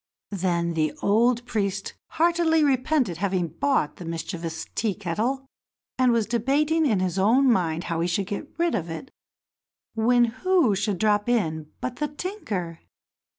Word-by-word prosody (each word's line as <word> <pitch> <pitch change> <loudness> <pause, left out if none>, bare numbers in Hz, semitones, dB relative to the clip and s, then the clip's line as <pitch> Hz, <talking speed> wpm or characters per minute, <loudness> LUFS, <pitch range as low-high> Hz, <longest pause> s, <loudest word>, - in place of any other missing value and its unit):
Then 170 -3 0
the 155 -2 0
old 235 +4 +3
priest 200 -5 -2 0.2
heartily 330 -1 +3
repented 260 - +1
having 185 -2 -1
bought 170 - 0
the - - -8
mischievous 165 0 -5
Tea 215 -4 -1
kettle, 220 +9 -2 0.5
and 255 -1 +4
was 230 -2 +2
debating 290 +8 +1
in 215 -7 +2
his 185 0 -1
own 245 +7 +4
mind 170 -5 0
how 165 -1 -2
he 170 - +1
should 185 +3 0
get 205 +10 -5
rid 340 -1 +1
of 170 -5 -2
it 165 - -7 0.8
when 240 +2 +4 0.2
who 365 - +4
should 200 0 -1
drop 210 +2 +2
in 160 -10 0
but 255 -1 -4
the 300 - -1
tinker? 220 - -5
210 Hz, 150 wpm, -25 LUFS, 175-265 Hz, 0.8 s, and